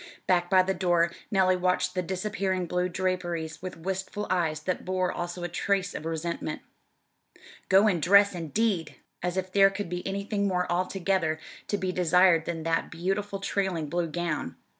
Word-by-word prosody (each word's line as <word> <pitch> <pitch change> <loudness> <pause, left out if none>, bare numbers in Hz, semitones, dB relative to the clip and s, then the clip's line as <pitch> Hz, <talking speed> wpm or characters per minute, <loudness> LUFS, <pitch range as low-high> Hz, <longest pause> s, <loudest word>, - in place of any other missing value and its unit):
Back 175 -1 +2
by 185 0 +6
the 190 +1 0
door 175 -2 +2 0.2
Nellie 190 -3 +3
watched 185 0 +1
the 185 - 0
disappearing 185 0 -2
blue 180 +1 -1
draperies 175 -3 -2
with 185 -2 -6
wistful 190 +4 -3
eyes 160 -4 0
that 185 +4 -2
bore 185 0 0
also 175 0 -5
a - - -1
trace 195 +2 -1
of 155 - -6
resentment. 165 +1 -3 1.1
"Go 195 +2 +6
and 180 -6 +1
dress" 200 +4 +6
indeed! 175 +2 -1 0.3
As 180 +1 -2
if 185 0 -2
there 195 0 +6
could 195 -1 -5
be 180 0 -3
anything 200 +1 -1
more 180 -2 +1
altogether 180 -2 0 0.3
to 205 - 0
be 185 -1 -1
desired 180 -1 +4
than 165 -2 -4
that 165 0 0
beautiful 195 +4 -2
trailing 190 -6 -1
blue 175 +1 0
gown! 165 - -3
180 Hz, 165 wpm, -27 LUFS, 170-190 Hz, 1.1 s, by